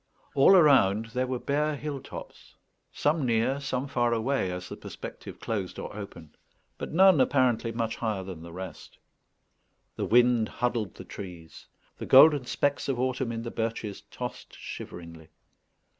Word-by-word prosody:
All 140 +8 +6
around 115 - +5
there 130 0 0
were 130 0 -2
bare 150 +4 0
hill 145 -1 -5
tops, - - -11 0.4
some 150 +1 0
near, 120 +3 +1
some 135 -1 -3
far 120 -3 +1
away, 115 -4 0
as 90 0 -6
the - - -7
perspective - - -9
closed 100 -5 -4
or - - -7
opened, 85 -7 -10 0.4
but - - -5
none 185 -3 +6
apparently 125 -4 +2
much 115 -1 -2
higher 110 -5 -2
than 95 -4 -8
the 85 0 -10
rest. 95 +2 -9 1.0
The - - -1
wind 120 -1 +4
huddled 120 -5 -2
the - - -10
trees. 85 -5 -10 0.3
The - - -6
golden 140 0 +7
specks 145 0 0
of 130 -3 -1
autumn 130 -1 -1
in 115 0 -4
the 120 - -5
birches 110 -2 -3
tossed - - -7
shiveringly. 85 -2 -9
120 Hz, 155 wpm, -28 LUFS, 100-135 Hz, 1.0 s, golden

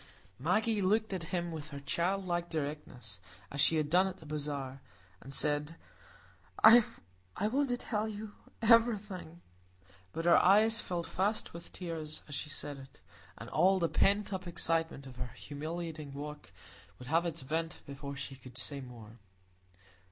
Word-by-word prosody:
Maggie 210 - +2
looked 215 +2 +2
at 180 -3 -3
him 175 -2 -1
with 155 -2 -5
her 140 - -6
childlike 175 +3 -1
directness 140 - -5 0.3
as 140 - 0
she 165 - +5
had 155 -1 +1
done 180 +5 +4
at 190 -1 -5
the 160 - -14
bazaar, 145 -3 -4 0.4
and 135 - -10
said, 150 +2 +1 0.9
"I 235 +2 +11 0.6
want 255 +8 +1
to 245 - +1
tell 220 -3 -1
you 215 0 -6 0.3
everything." 210 -7 +3 0.7
But 165 - -4
her 175 - +7
eyes 215 +4 +5
filled 175 -3 -3
fast 205 +6 -1
with 170 0 -8
tears 160 -4 -5
as 145 - -8
she 150 - -3
said 145 -1 -3
it, 135 0 -14 0.4
and - - -8
all 190 +1 +4
the 170 -3 +1
pent 200 +5 +2
up 185 -1 -4
excitement 165 -4 0
of 130 -2 -11
her 125 -2 -5
humiliating 155 -1 -5
walk 150 -4 -7 0.5
would 125 - -11
have 165 +2 +3
its 165 -1 -4
vent 160 +5 -3
before 140 0 -7
she 135 0 -5
could 125 -1 -13
say 140 +2 -3
more. 115 -3 -11
165 Hz, 160 wpm, -33 LUFS, 145-190 Hz, 0.9 s, I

